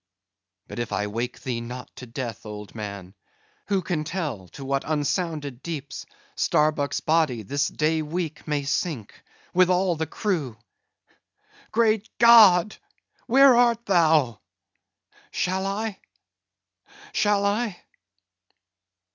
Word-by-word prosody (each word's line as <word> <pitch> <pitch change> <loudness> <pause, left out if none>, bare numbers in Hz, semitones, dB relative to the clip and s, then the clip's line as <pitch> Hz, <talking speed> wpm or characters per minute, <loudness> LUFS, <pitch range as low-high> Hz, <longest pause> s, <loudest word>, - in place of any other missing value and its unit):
—But - - -7
if 120 - -3
I 105 - -1
wake 115 +4 -4
thee 120 -3 -3
not 125 +2 -8
to 125 - -9
death, 115 -2 -6
old 105 -2 -9
man, 100 -4 -7 0.5
who 195 -3 0
can 165 -3 -2
tell 150 - -4
to 135 +9 -10
what 135 0 -1
unsounded 150 -3 -2
deeps 145 -6 -6 0.3
Starbuck's 150 -2 +1
body 155 -8 +1
this 140 +7 0
day 155 +1 0
week 160 0 -4
may 150 -2 -1
sink, 140 - -3 0.3
with 185 0 +4
all 180 -1 +2
the 160 0 -3
crew! 160 - -2 1.1
Great 220 -2 +2
God, 215 -5 +7 0.5
where 265 +1 +7
art 235 -1 +3
Thou? 160 - +3 0.9
Shall 190 +1 -1
I? 205 +1 -3 1.1
shall 205 - +2
I? 205 -1 -1
155 Hz, 115 wpm, -25 LUFS, 125-190 Hz, 1.1 s, God